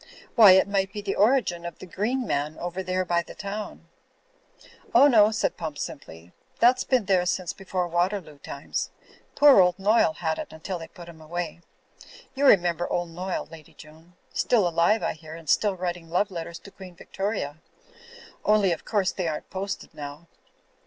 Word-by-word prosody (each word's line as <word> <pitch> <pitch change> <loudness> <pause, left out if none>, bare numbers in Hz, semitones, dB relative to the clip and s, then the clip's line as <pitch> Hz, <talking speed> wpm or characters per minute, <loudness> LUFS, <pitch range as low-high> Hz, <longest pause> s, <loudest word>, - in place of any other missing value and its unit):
Why, 215 -6 +9
it 190 +1 +4
might 195 -1 0
be 205 - -6
the 195 - -1
origin 210 -6 +2
of 170 -2 -7
the - - -10
'Green 225 +8 -2
Man' 150 -1 -2
over 175 +2 -4
there 185 0 -1
by 170 -1 +1
the - - -12
town/' 205 +1 -6 1.1
"Oh, 255 +4 +8
no," 220 -7 +6
said 220 - -1
Pump, 155 -3 -5
skiply, 90 - -8 0.3
"that's 250 +2 +4
been 255 -5 +1
there 185 -2 +3
since 180 -1 -1
before 185 -2 -3
Waterloo 175 -3 -2
time^. 140 0 -5 0.5
Poor 285 -5 +7
old 180 0 +3
Noyle 200 -4 +3
had 160 -2 -2
it - - -6
until 170 +3 -6
they 165 - -8
put 175 -1 -13
him 165 -2 -13
away. 170 +1 -5 0.7
You 280 +1 +2
remember 175 -4 +3
old 175 -1 -1
Noyle, 180 +3 -4
Lady 160 -2 -14
Joan. 160 +3 -16 0.2
Still 215 -7 +2
alive, 170 +6 +2
I - - 0
hear, 155 0 -11
and 165 -1 -12
still 205 +5 +2
writing 175 -2 -4
love 185 +4 0
letters 170 -1 -6
to 200 - -14
Queen 185 -3 -12
Victoria. 170 -6 -4 0.8
Only 210 -3 +3
of 165 - -3
course 200 -4 +1
they 180 -3 -3
aren't 155 -1 -5
posted 195 +1 -5
now." 145 +2 -8
180 Hz, 180 wpm, -25 LUFS, 165-200 Hz, 1.1 s, Why